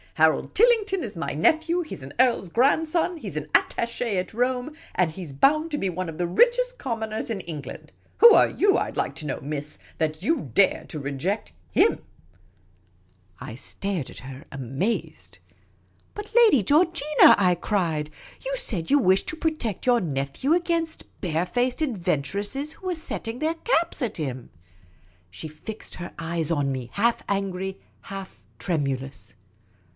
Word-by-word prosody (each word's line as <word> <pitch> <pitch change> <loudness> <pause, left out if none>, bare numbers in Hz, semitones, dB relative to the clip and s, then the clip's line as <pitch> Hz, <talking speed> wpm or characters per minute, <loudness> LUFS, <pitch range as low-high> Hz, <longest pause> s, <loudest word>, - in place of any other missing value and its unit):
Harold 160 0 +3
Tillington 420 -5 +3
is 210 - -6
my 165 - -3
nephew; 320 - +2
he 325 - -6
's - - -14
an 130 - -8
earl's 240 -8 +3
grandson; 315 - +2
he - - -6
's - - -7
an - - -4
attache 235 -3 +1
at 180 - -3
Rome; 250 +4 0 0.2
and 180 -3 +2
he 185 +4 -8
's 155 - -8
bound 305 - +3
to 295 - -1
be 195 - -1
one 180 0 -3
of 160 - -8
the 175 - 0
richest - - +3
commoners 225 - -3
in 210 -4 -2
Eng 160 -5 -6
land. - - -10 0.3
Who 470 -1 +9
are - - +6
you, 395 0 +3
I - - -1
'd - - -12
like 140 - -1
to 155 -1 -5
know, 135 - -3
miss, 150 +1 -5 0.2
that 155 -1 -1
you 250 - 0
dare 200 -1 +3
to 155 - -5
reject 145 +9 -3 0.2
him? - - +3 0.7
" 90 +1 -36
I 110 - -7
stared 175 +4 -4
at - - -10
her, 130 +2 -9
amazed. 135 - -3 0.4
" - - -37
But, 420 +2 -8
Lady 445 - +6
Georgina," 305 - +5
I 180 -3 +3
cried, 165 -5 -1 0.2
" - - -21
you - - -1
said 205 - -1
you 290 - +6
wished 190 -5 +3
to - - -3
protect 310 - -2
your 245 -1 +4
nephew 140 - -1
against 335 -2 0 0.2
bare 170 -2 0
faced 245 - -1
adventuresses 205 - -1
who 375 - -9
were 360 - 0
setting 245 -7 -5
their 315 +2 0
caps 335 -3 0
at 245 - -2
him." 130 -6 -4 0.8
She 95 - -8
fixed 185 +8 -8
her 175 -1 -7
eyes 165 -1 -2
on 145 -4 +1
me, 130 -2 -4
half 230 +3 +1
angry, 190 -1 -2 0.2
half 195 -1 -9
tremulous. 140 -6 -3
200 Hz, 175 wpm, -25 LUFS, -, 0.8 s, Who